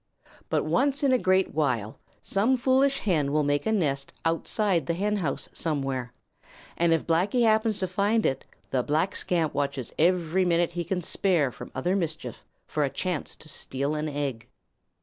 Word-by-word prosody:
But - - +1
once 280 +1 +1
in 275 - +4
a 255 - +4
great 185 -1 +2
while 120 -9 -1 0.2
some 225 +7 +2
foolish 265 +2 +2
hen 155 -8 +1
will 150 +1 +2
make 145 +2 0
a - - +2
nest 140 -9 0
outside 170 +2 0
the 170 - 0
henhouse 195 -6 -1
somewhere, 135 -5 -2 0.6
and 170 0 +2
if 165 -2 +2
Blacky 190 +9 +2
happens 220 -1 +3
to 185 - -1
find 205 +4 +1
it 135 - 0 0.3
the 130 - +2
black 155 +8 0
scamp 165 -4 0
watches 140 -3 -2
every 175 +1 +2
minute 175 -1 +2
he 175 0 -3
can 180 +2 -2
spare 165 -7 +1
from - - -10
other 175 +9 0
mischief 165 -5 -3 0.2
for 150 - -1
a 140 - +1
chance 165 +3 -3
to - - -10
steal 140 -1 -2
an 155 0 -2
egg. 140 -6 -3
170 Hz, 170 wpm, -27 LUFS, 145-195 Hz, 0.6 s, in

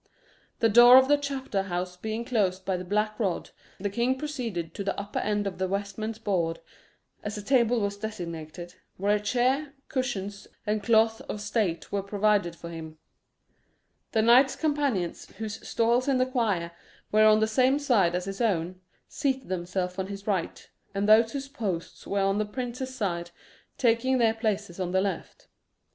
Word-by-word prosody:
The 230 - +5
door 240 +3 +9
of 260 0 +6
the 290 - +5
chapter 275 -8 -2
house 180 -1 -3
being 220 +5 -4
closed 190 -6 0
by 190 - 0
the 180 - -4
black 210 +3 -1
rod, 195 -6 -1 0.3
the 200 - -1
king 240 +4 +1
proceeded 235 - -4
to 200 - -4
the 195 0 -2
upper 200 +1 -3
end 205 0 0
of 190 -2 -4
the 190 - 0
vestments 200 +3 -3
board 175 -7 -1 0.6
as 210 0 -5
the 210 - -6
table 245 -1 +3
was 200 -1 -2
designated 175 -5 -6 0.2
where 205 +2 +2
a - - 0
chair, 255 +7 0 0.2
cushions, 205 -6 -3 0.2
and 210 0 0
cloth 225 +1 +3
of 210 - -3
state 205 -7 -1
were 200 - 0
provided 200 -3 +1
for 170 0 -9
him; 160 -1 -8 1.1
the 220 - +2
knights 250 +4 +6
companions, 285 - -1
whose 220 -1 -6
stalls 235 +3 +2
in 275 -2 +3
the 255 - +3
choir 215 -10 -1 0.4
were 215 +1 +5
on 215 0 +6
the 220 - +3
same 255 +5 +3
side 225 -12 +2
as 180 0 -2
his 195 +3 -5
own, 185 -4 0 0.3
seating 265 -5 -2
themselves 180 0 -3
on 190 - -2
his 200 0 -7
right, 190 -5 -2 0.2
and 200 +1 0
those 225 +1 +6
whose 275 -1 -4
posts 205 - -5
were 200 0 0
on 195 +1 +1
the - - +2
prince's 250 +3 -5
side 175 -7 -2 0.5
taking 250 +2 +2
their 230 -2 +3
places 210 -5 -2
on 180 -1 -2
the 190 - +4
left. 195 -4 -4
210 Hz, 175 wpm, -27 LUFS, 190-240 Hz, 1.1 s, door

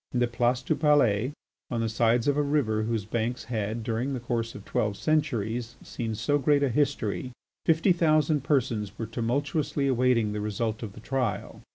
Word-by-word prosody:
In 125 - +1
the 120 - +4
Place 120 +1 0
du 145 - +1
Palais 135 -6 +3 0.4
on 115 -2 -1
the 115 - 0
sides 115 +2 +2
of 145 - +3
a 145 - +2
river 140 -7 +1
whose 110 -2 -1
banks 115 +3 -2
had 110 -1 -3
during 120 +4 -1
the - - -3
course 115 -1 -2
of 105 - -10
twelve 105 -2 -1
centuries 120 -7 -1
seen 115 -2 -4
so 145 +6 +1
great 145 +1 +3
a 140 - +2
history, 130 -3 0 0.4
fifty 165 +4 +4
thousand 155 -4 +2
persons 115 -8 0
were 115 - -3
tumultuously 140 +5 -1
awaiting 125 -4 +2
the 105 - -3
result 105 +1 -2
of 110 -4 -6
the - - -11
trial. 125 -4 -2
120 Hz, 185 wpm, -27 LUFS, 110-140 Hz, 0.4 s, the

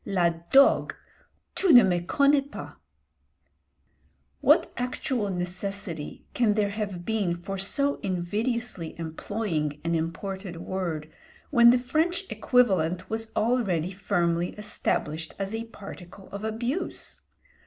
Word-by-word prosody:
La 180 -3 +2 0.2
dogue! 275 +1 +5 0.6
tu 380 - +3
ne 245 -5 +10
me 180 -2 +2
connais 280 +10 +3
pas." - - -8 1.7
What - - +4
actual 245 -3 -2
necessity 180 -2 -4
can 220 -4 +2
there 205 -2 +1
have 200 -4 -4
been 205 -6 0
for 190 +3 -5
so 280 +9 +1
invidiously 205 +1 -2
employing 160 -2 -3
an 170 0 0
imported 175 +3 -3
word, 170 -4 -4 0.4
when 235 0 +7
the 245 - +6
French 315 +9 0
equivalent 185 -8 +2
was 225 0 -2
already 200 -8 +1
firmly 175 -3 0
established 165 -6 -2
as 195 +1 -3
a 225 +1 -3
particle 195 -3 -11
of 200 +1 -6
abuse? 235 +10 -3
195 Hz, 115 wpm, -27 LUFS, 175-230 Hz, 1.7 s, ne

